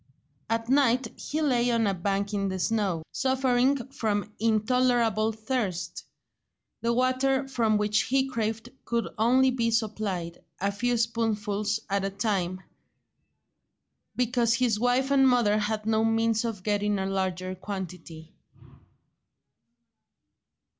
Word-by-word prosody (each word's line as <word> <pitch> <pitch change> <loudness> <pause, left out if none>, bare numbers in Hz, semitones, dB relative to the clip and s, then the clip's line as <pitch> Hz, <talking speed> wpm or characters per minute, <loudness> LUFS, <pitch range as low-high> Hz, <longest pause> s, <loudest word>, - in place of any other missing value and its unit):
At 230 0 -1
night 255 -2 +3
he 310 +2 -3
lay 245 -4 +2
on 230 -1 +2
a 200 - +1
bank 200 +3 -2
in 200 -1 0
the 190 -1 -3
snow, 190 -4 0
suffering 260 0 +1
from 215 -6 -2
intolerable 225 0 +2
thirst; 220 -5 -3 0.8
the 235 - +1
water 260 +2 +1
for 240 -4 0
which 210 0 +2
he 265 +2 +1
craved 225 -1 -3
could 235 -1 -1
only 255 +4 +4
be 235 -2 0
supplied, 210 -6 -2 0.2
a 200 +1 0
few 240 +4 0
spoonfuls 215 -2 -1
at 200 -1 0
a 195 - 0
time, 190 -3 -2 1.5
because 240 -2 +2
his 230 -4 +1
wife 250 +3 +1
and 270 -1 +5
mother 220 -4 +3
had 215 0 -2
no 220 0 +2
means 225 0 +1
of 215 -5 -4
getting 205 0 0
a 190 - -2
larger 185 -1 -2
quantity. 180 -5 -8
225 Hz, 125 wpm, -27 LUFS, 200-245 Hz, 1.5 s, and